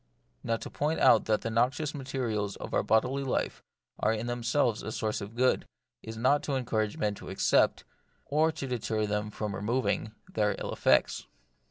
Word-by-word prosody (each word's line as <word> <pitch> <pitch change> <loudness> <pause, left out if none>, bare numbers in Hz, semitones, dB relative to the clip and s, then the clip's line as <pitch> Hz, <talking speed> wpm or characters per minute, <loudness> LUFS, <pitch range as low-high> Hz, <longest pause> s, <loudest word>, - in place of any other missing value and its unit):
Now 115 - 0
to - - -8
point 150 +3 -1
out 110 - +6
that 110 -1 +1
the 115 - -3
noxious 130 +6 +1
materials 120 -7 -2
of - - -8
our - - +3
bodily 125 +5 +2
life 130 - -1 0.4
are - - +2
in 110 +1 -2
themselves 120 0 0
a 110 - -5
source 110 0 -2
of 100 +3 -8
good, 130 +1 +2 0.3
is 110 0 -8
not 130 +5 +3
to 140 - -1
encourage 110 -5 -1
men 105 -1 0
to - - -10
accept, - - +2 0.4
or 155 +3 +2
to 140 - -5
deter 110 -4 -1
them 105 0 -1
from 105 -1 -4
removing, 110 0 -1
their 105 -1 0
ill - - -4
effects. - - +2
115 Hz, 180 wpm, -29 LUFS, 110-130 Hz, 0.4 s, out